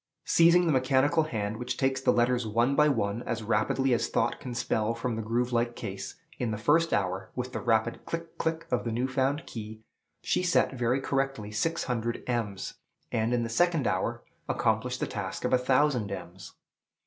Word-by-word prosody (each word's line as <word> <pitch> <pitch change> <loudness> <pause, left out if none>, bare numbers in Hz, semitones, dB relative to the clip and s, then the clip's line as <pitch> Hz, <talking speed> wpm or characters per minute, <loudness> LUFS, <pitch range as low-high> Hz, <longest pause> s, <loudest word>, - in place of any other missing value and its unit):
Seizing 170 +1 +5
the 165 - +2
mechanical 135 +3 +3
hand, 110 -6 -3
which 125 +1 -4
takes 135 -1 +1
the - - +4
letters 120 0 +2
one 120 +5 +2
by 150 +1 +5
one 105 -5 0
as 115 -2 -3
rapidly 115 +4 +1
as 120 - +1
thought 115 - 0
can 125 -3 -6
spell 110 -1 0
from 115 0 -2
the 115 - -3
groove 120 +3 -1
like 120 0 +1
case, 95 0 -6 0.2
in 125 -3 -1
the 105 - -2
first 160 +10 +3
hour, 95 -1 -1
with 125 0 -4
the - - -2
rapid 115 0 +1
click, 165 0 -5
click, 160 +1 -1
of 125 - +1
the 115 - -2
new 120 +3 0
found 135 +3 0
"key," 110 -1 -8 0.4
she - - +1
set 175 -5 +2
very 125 +1 +1
correctly 135 -6 -2
six 165 +10 0
hundred 120 -1 -2
ems, 110 -6 -2 0.4
and 110 +1 0
in 120 -1 +1
the - - -2
second 165 +4 +2
hour 115 +5 -1 0.3
accomplished 120 +3 0
the - - +2
task 95 -3 -4
of - - 0
a - - +7
thousand 130 -4 +2
ems. 90 -1 -8
120 Hz, 195 wpm, -28 LUFS, 110-135 Hz, 0.4 s, a